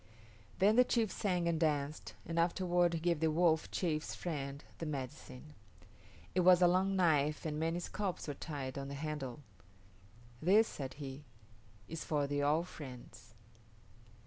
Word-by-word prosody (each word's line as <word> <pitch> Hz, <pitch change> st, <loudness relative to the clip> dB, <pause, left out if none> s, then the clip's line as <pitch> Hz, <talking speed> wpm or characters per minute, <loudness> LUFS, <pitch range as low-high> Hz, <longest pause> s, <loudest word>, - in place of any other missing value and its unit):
Then 210 Hz, +4 st, +4 dB
the 250 Hz, -, +8 dB
chief 230 Hz, -4 st, +1 dB
sang 180 Hz, -4 st, 0 dB
and 165 Hz, -2 st, +1 dB
danced, 150 Hz, -2 st, -1 dB
and 165 Hz, 0 st, -2 dB
afterward 175 Hz, 0 st, +2 dB
he -, -, -1 dB
gave 170 Hz, -1 st, +1 dB
the 160 Hz, 0 st, +2 dB
Wolf 160 Hz, 0 st, +2 dB
chief's 160 Hz, -4 st, -2 dB
friend 140 Hz, -4 st, -4 dB, 0.2 s
the 165 Hz, -, -3 dB
medicine. 140 Hz, 0 st, -6 dB, 0.8 s
It 185 Hz, -, +1 dB
was 180 Hz, 0 st, +7 dB
a 180 Hz, -, +6 dB
long 190 Hz, +2 st, +2 dB
knife 155 Hz, -5 st, +2 dB
and 150 Hz, -1 st, -2 dB
many 165 Hz, +2 st, 0 dB
scalps 190 Hz, 0 st, -3 dB
were 145 Hz, -, -2 dB
tied 140 Hz, -3 st, -5 dB
on 135 Hz, -, -5 dB
the 140 Hz, -, -6 dB
handle. 150 Hz, -3 st, -4 dB, 1.0 s
"This," 205 Hz, +7 st, +5 dB
said 130 Hz, -2 st, -6 dB
he, 140 Hz, 0 st, -8 dB, 0.6 s
"is 165 Hz, 0 st, -5 dB
for 150 Hz, -2 st, 0 dB
the 145 Hz, 0 st, -1 dB
All 150 Hz, +3 st, +3 dB
Friends." 125 Hz, -9 st, -11 dB
155 Hz, 155 wpm, -35 LUFS, 145-175 Hz, 1.0 s, the